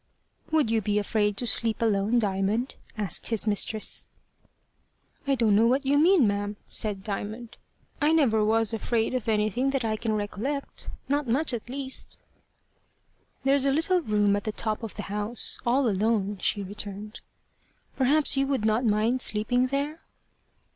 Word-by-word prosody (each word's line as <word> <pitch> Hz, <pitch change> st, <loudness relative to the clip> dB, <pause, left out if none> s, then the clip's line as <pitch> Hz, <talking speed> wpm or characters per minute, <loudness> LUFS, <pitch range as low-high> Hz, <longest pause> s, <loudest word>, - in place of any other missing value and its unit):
"Would 310 Hz, -8 st, +2 dB
you 225 Hz, -1 st, +2 dB
be 205 Hz, +1 st, 0 dB
afraid 210 Hz, 0 st, 0 dB
to 245 Hz, -, +1 dB
sleep 225 Hz, -1 st, 0 dB
alone, 215 Hz, 0 st, +1 dB
Diamond?" 210 Hz, +3 st, 0 dB, 0.2 s
asked 205 Hz, -6 st, -2 dB
his 225 Hz, -2 st, 0 dB
mistress. 215 Hz, 0 st, +1 dB, 1.2 s
"I 275 Hz, -, +3 dB
don't 225 Hz, -5 st, +2 dB
know 225 Hz, +3 st, +4 dB
what 265 Hz, +3 st, +1 dB
you 285 Hz, +2 st, +3 dB
mean, 335 Hz, -3 st, +5 dB
ma'am," 205 Hz, 0 st, -2 dB
said 205 Hz, -3 st, 0 dB
Diamond. 215 Hz, +3 st, -6 dB, 0.4 s
"I 300 Hz, +1 st, +3 dB
never 250 Hz, -10 st, +3 dB
was 225 Hz, +1 st, +2 dB
afraid 225 Hz, +1 st, -1 dB
of 245 Hz, -3 st, -2 dB
anything 215 Hz, +5 st, +1 dB
that 270 Hz, -3 st, -1 dB
I 220 Hz, -1 st, 0 dB
can 220 Hz, 0 st, -2 dB
recollect 220 Hz, +7 st, -4 dB, 0.2 s
not 285 Hz, 0 st, 0 dB
much, 270 Hz, +5 st, 0 dB
at 240 Hz, 0 st, -5 dB
least." 265 Hz, 0 st, -2 dB, 1.3 s
"There's 275 Hz, 0 st, +3 dB
a 275 Hz, -, +3 dB
little 350 Hz, +5 st, +2 dB
room 210 Hz, -6 st, +2 dB
at 205 Hz, -, -4 dB
the 215 Hz, -, -1 dB
top 215 Hz, 0 st, -3 dB
of 225 Hz, -3 st, -7 dB
the -, -, -5 dB
house 210 Hz, +4 st, 0 dB
all 255 Hz, +2 st, +3 dB
alone," 205 Hz, -1 st, 0 dB
she 200 Hz, +2 st, -1 dB
returned; 205 Hz, +2 st, -7 dB, 0.8 s
"perhaps 285 Hz, +3 st, +4 dB
you 275 Hz, 0 st, +1 dB
would 270 Hz, -6 st, -1 dB
not 220 Hz, +3 st, +2 dB
mind 225 Hz, +3 st, +1 dB
sleeping 245 Hz, +4 st, +1 dB
there?" 285 Hz, +4 st, -3 dB
225 Hz, 160 wpm, -26 LUFS, 210-265 Hz, 1.3 s, mean